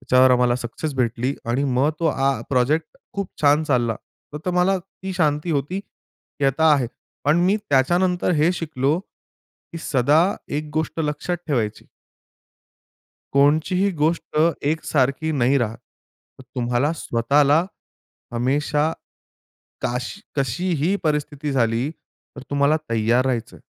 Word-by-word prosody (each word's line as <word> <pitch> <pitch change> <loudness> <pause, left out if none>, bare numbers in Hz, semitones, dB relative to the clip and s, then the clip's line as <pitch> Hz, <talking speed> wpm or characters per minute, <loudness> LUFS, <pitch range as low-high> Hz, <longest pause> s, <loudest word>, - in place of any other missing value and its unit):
त्याच्यावर 130 +1 +4
आम्हाला 125 -1 +3
सक्सेस 125 +5 -4
भेटली 125 +1 0 0.2
आणि 130 +4 +1
मग 140 +4 +3
तो 165 - +2
आं 135 -2 +1
प्रोजेक्ट 140 +5 +1 0.2
खूप 200 -2 -3
छान 145 +2 +4
चालला. 120 -6 +1 0.4
तर 160 +4 -3
मला 180 +2 +2
ती 190 +1 -9
शांती 155 -1 0
होती, 150 +7 -1
की 145 - -11
आता 150 +3 +4
आहे. 130 -4 0 0.4
पण 150 +4 +4
मी 200 +3 +3
त्याच्यानंतर 175 +7 +2
हे 160 +2 +3
शिकलो 155 -3 -1 0.7
की 165 - -5
सदा 145 +1 +3 0.4
एक 150 0 -4
गोष्ट 160 +1 -1
लक्षात 150 +3 -2
ठेवायची. 115 -8 -2 1.4
कोणतीही 155 +8 +3
गोष्ट 155 0 0 0.3
एकसारखी 150 -1 0
नाही 135 -1 +3
राहात. 115 -2 -2 0.6
तर 130 - -11
तुम्हाला 125 +4 +1
स्वतःला 140 +6 +2 0.7
हमेशा, 145 +5 +1 0.9
काश 125 +1 -2 0.2
कशीही 165 - 0
परिस्थिती 150 -1 -1
झाली 120 0 +1 0.5
तर 140 - -8
तुम्हाला 145 +2 +3
तयार 115 +3 +2
राहायचं. 120 -4 -2
145 Hz, 120 wpm, -22 LUFS, 125-160 Hz, 1.4 s, त्याच्यावर